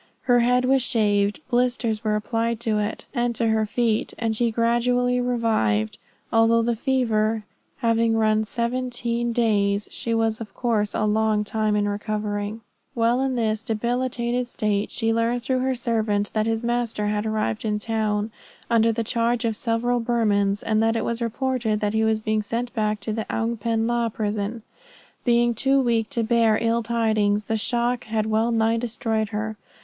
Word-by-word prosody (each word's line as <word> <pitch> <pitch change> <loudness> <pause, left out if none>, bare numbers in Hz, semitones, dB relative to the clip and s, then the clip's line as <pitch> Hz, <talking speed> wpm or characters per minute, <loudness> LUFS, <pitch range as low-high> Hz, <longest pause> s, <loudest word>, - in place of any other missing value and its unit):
Her 245 -1 +4
head 250 +1 +3
was 265 +1 +3
shaved, 210 -2 +1
blisters 240 -3 0
were 215 -1 +1
applied 225 +1 -1
to 220 -2 0
it 210 +1 -3
and 240 -2 0
to 230 0 +1
her 220 -1 +1
feet, 225 0 0
and 225 -2 -1
she 235 +1 +1
gradually 245 +2 +1
revived; 220 - 0 0.3
although 225 0 +4
the 235 0 0
fever 225 -4 0 0.4
having 230 -1 +2
run 215 0 +2
seventeen 240 0 -2
days, 210 -3 +1
she 230 -1 -2
was 225 0 0
of 210 -3 -8
course 220 -4 0
a 215 - +1
long 215 0 +2
time 215 0 0
in 205 0 +1
recovering. 210 +1 -3 0.3
While 235 +2 +2
in 265 -1 0
this 220 -2 0
debilitated 240 +2 -1
state, 210 -3 -1
she 225 -1 0
learned 230 +1 0
through 255 +1 0
her 260 0 0
servant 220 -4 0
that 215 0 0
his 225 +1 -1
master 235 -3 -1
had 210 +1 -1
arrived 215 - -1
in 210 -1 0
town, 215 0 -1 0.4
under 230 0 +4
the 230 +1 -2
charge 235 +1 0
of 225 -1 0
several 240 +2 0
Burmans, 210 -4 +1
and 215 -1 +1
that 225 0 +2
it 225 - -1
was 235 0 -2
reported 235 -2 -1
that 210 0 0
he 220 0 +2
was 220 0 +1
to - - -30
be 215 0 +1
sent 235 +3 -3
back 215 -3 -1
to 215 +1 -3
the 220 0 -3
Oung 225 0 -1
pen 225 +1 0
la 235 0 0
prison. 215 +1 -3 0.6
Being 240 -1 +3
too 270 +4 +2
weak 230 -4 +1
to 230 - -1
bear 225 -1 +3
ill 230 0 +1
tidings, 220 -3 +1
the 225 - -2
shock 240 +2 0
had 220 -1 -1
well 220 +1 +1
nigh 225 0 +2
destroyed 225 -2 -1
her. 215 0 -4
225 Hz, 175 wpm, -24 LUFS, 215-235 Hz, 0.6 s, Her